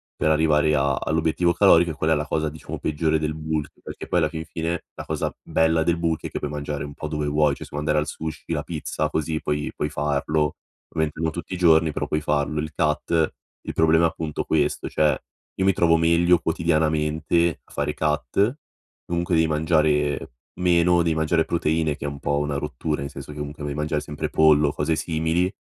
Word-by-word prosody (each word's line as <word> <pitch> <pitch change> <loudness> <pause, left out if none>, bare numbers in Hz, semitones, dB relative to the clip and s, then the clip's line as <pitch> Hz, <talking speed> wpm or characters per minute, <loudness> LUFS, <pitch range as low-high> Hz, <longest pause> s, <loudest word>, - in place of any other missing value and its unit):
per - - +1
arrivare 75 -1 +3
a 70 -1 +2
all'obiettivo 80 +4 +1
calorico, 85 -3 +5
e - - -5
quella 80 +1 +1
è - - +3
la 75 0 -1
cosa 75 +1 0
diciamo 80 - -8
peggiore 80 +1 0
del 75 0 -2
bulk 80 -1 -3
perché - - -8
poi - - 0
alla 80 -2 +2
fin 80 0 -6
fine 80 +1 -3
la - - -7
cosa - - -2
bella 80 0 +2
del 85 +1 +1
bulk, 80 -2 -1
è - - -4
che - - -3
puoi 75 - -3
mangiare 75 -1 -4
un 70 0 -7
po' 80 - -5
dove 75 -1 -2
vuoi. 75 0 +3
Cioè - - -9
se - - -12
vuoi 75 +1 -3
andare 75 0 +1
al 75 - -2
sushi, 80 +2 -6
la 75 -2 -1
pizza, 75 -1 -3
così 80 0 -1
puoi 75 0 -2
puoi 75 - -2
farlo. 75 +1 0 0.3
Ovviamente 80 -1 -2
non 80 -1 0
tutti 85 +2 -6
giorni, 80 -3 +4
però - - -3
puoi 75 - -1
farlo, 75 +1 0
il 80 0 -5
cut, 80 +2 +1 0.3
Il - - -6
problema 80 +1 +4
è - - +6
appunto 80 -2 -4
questo: 75 -2 0
cioè 75 -1 +2 0.4
io 95 - +2
mi 95 - +4
trovo 85 -2 +4
meglio 85 +1 +4
quotidianamente 80 0 +1
a - - -24
fare 75 - -2
cut, 75 - 0 0.5
comunque 85 +1 -2
devi 80 0 +3
mangiare 75 -3 +1 0.3
meno, 90 -1 +4
devi 80 -1 +1
mangiare 80 +1 +2
proteine 80 -2 0
che 70 - -7
è - - -1
un 70 0 -5
po' 70 +1 0
una 75 -1 -1
rottura, 70 +2 -3
nel 70 - -4
senso - - -8
che 75 - -10
comunque 75 +1 -6
devi 75 -1 -3
mangiare 75 0 -1
sempre 75 0 -4
pollo 75 -1 +5
o - - -4
cose 75 +2 0
simili, 80 +3 0
80 Hz, 215 wpm, -24 LUFS, 75-80 Hz, 0.5 s, è